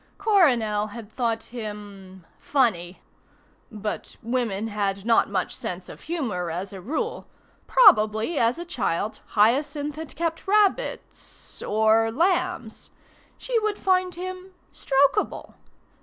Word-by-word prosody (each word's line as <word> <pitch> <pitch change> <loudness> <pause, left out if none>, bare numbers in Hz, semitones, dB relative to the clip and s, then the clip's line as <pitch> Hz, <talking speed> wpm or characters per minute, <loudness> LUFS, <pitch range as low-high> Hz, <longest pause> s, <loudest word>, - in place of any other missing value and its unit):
Coronel 250 - +3
had 220 0 -10
thought 230 -2 -1
him 205 -5 -8
funny; 190 -10 0 0.7
but 210 -1 -5
women 230 -4 -1
had 200 -1 -2
not 230 -3 +3
much 190 -3 -2
sense 180 0 -6
of - - -11
humour 235 - -3
as 185 +4 -5
a 190 - -8
rule. 320 - -3 0.4
Probably 225 - +5
as 230 +5 +2
a 345 - -6
child 220 - -2 0.2
Hyacinth 285 +7 +2
had 315 -4 -7
kept 330 +2 -3
rabbits... 420 +4 -1
or 220 +1 +3
lambs. 345 - -1 0.5
She - - 0
would 425 -1 -1
find 370 -1 +1
him 370 +1 -7 0.2
strokable. 280 +9 +1
235 Hz, 115 wpm, -25 LUFS, 210-345 Hz, 0.7 s, Probably